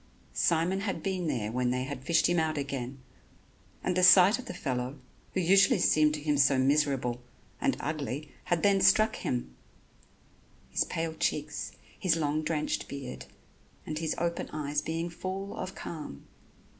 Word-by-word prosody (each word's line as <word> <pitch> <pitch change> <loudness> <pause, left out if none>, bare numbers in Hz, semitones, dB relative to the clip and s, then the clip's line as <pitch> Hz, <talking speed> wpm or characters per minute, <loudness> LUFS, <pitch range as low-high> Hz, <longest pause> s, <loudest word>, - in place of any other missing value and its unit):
Simon 170 +3 +2
had 195 -5 -3
been 185 -3 -1
there 115 -7 -1
when 125 +1 0
they 125 +1 0
had 135 -1 -6
fished 165 +3 +3
him 175 -1 +2
out 155 -1 0
again; 135 -2 -4 0.9
and 180 - 0
the 185 - +2
sight 185 +5 +7
of 255 - -8
the - - -6
fellow, 130 -3 -3 0.4
who - - +2
usually 195 +7 +5
seemed 155 -3 +3
to - - -5
him 150 -1 +1
so 140 -1 +5
miserable, 135 -3 +1 0.4
and 275 -1 +1
ugly, 150 -1 -4
had 175 -2 0
then 200 -1 +4
struck 215 +3 +4
him 60 0 -3 1.2
his - - +1
pale 165 0 -3
cheeks, 150 -10 -2 0.3
his 180 -4 +2
long 155 -1 0
drenched 155 -1 -2
beard 135 -3 -7 0.6
and 155 0 -4
his 160 -2 -1
open 170 0 -2
eyes 150 -1 -2
being 165 +1 -3
full 190 +3 -5
of 185 +1 -5
calm. 150 - -7
155 Hz, 160 wpm, -29 LUFS, 140-180 Hz, 1.2 s, sight